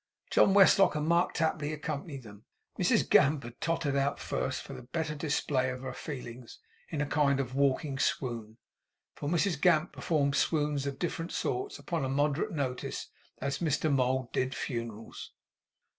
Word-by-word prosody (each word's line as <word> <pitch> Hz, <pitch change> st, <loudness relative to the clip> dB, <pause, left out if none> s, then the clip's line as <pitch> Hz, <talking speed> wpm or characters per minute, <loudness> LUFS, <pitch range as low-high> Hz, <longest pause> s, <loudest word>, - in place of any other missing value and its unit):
John 195 Hz, -, +5 dB
Westlock 195 Hz, -3 st, +6 dB
and 150 Hz, 0 st, -1 dB
Mark 170 Hz, +1 st, +2 dB
Tapley 155 Hz, -2 st, 0 dB
accompanied 150 Hz, -2 st, -5 dB
them. 105 Hz, -2 st, -13 dB, 0.3 s
Mrs -, -, +3 dB
Gamp 145 Hz, 0 st, +4 dB
had 120 Hz, 0 st, -10 dB
tottered 160 Hz, -4 st, 0 dB
out 140 Hz, 0 st, +1 dB
first, -, -, -2 dB
for -, -, -9 dB
the -, -, -8 dB
better 150 Hz, +5 st, -3 dB
display 145 Hz, -3 st, 0 dB
of 125 Hz, 0 st, -5 dB
her 130 Hz, -, -5 dB
feelings, 125 Hz, -5 st, -8 dB, 0.3 s
in 150 Hz, -3 st, -2 dB
a -, -, +1 dB
kind 145 Hz, -2 st, +2 dB
of 130 Hz, -2 st, -2 dB
walking 135 Hz, 0 st, +1 dB
swoon; 115 Hz, -5 st, -1 dB, 0.6 s
for 145 Hz, -, -4 dB
Mrs 170 Hz, -2 st, +1 dB
Gamp 170 Hz, -1 st, +3 dB
performed 140 Hz, -4 st, 0 dB
swoons 150 Hz, -3 st, +1 dB
of 140 Hz, -1 st, -4 dB
different 170 Hz, +1 st, -3 dB
sorts, 390 Hz, +2 st, -2 dB
upon 165 Hz, -5 st, -3 dB
a 130 Hz, -, -1 dB
moderate 145 Hz, +8 st, +1 dB
notice, 135 Hz, -6 st, -3 dB, 0.3 s
as 140 Hz, 0 st, -2 dB
Mr 155 Hz, -2 st, +1 dB
Mould 130 Hz, -1 st, +1 dB
did 130 Hz, +1 st, 0 dB
Funerals. 115 Hz, -2 st, -5 dB
140 Hz, 160 wpm, -30 LUFS, 130-155 Hz, 0.6 s, Westlock